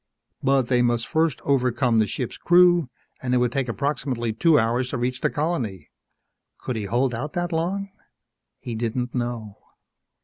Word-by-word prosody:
But 135 0 +3
they 125 0 +2
must 120 -1 +1
first 160 0 0
overpower 125 -3 +1
the 110 - +3
ship's 120 +4 -4
crew, 175 -4 +4 0.3
and 125 -1 0
it - - +4
would 125 -1 +2
take 130 -1 -1
approximately 125 -3 -2
two 160 +7 +4
hours 120 +2 +1
to 130 - -3
reach 125 +1 -2
the - - +2
colony. 145 - -3 0.7
Could 125 - -4
he 110 -2 -3
hold 120 +5 +1
out 145 +6 -4
that 175 0 -2
long? 190 +5 -2 0.7
He 120 - -7
didn't 120 +2 -2
know. 120 -4 -4
125 Hz, 165 wpm, -24 LUFS, 120-150 Hz, 0.7 s, crew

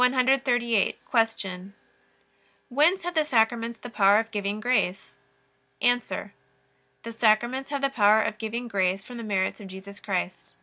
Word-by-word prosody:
Q. 250 -3 +2 1.8
Whence 310 +9 +3
have 355 +1 -3
the 315 -2 +2
Sacraments 230 -3 +1
the 245 - -9
power 200 -2 +5
of 225 +1 -1
giving 205 -1 -3
grace? 205 -6 -1 0.7
A. 245 0 +3 1.0
The 230 - -7
Sacraments 240 +4 +1
have 280 -1 -3
the 275 - +3
power 215 -2 +4
of 215 - -4
giving 235 +2 -4
grace 195 -3 0
from 245 +3 -10
the 230 - -6
merits 200 -1 -1
of 200 - -9
Jesus 190 +2 -11
Christ. 185 -2 -4
225 Hz, 140 wpm, -26 LUFS, 205-250 Hz, 1.8 s, power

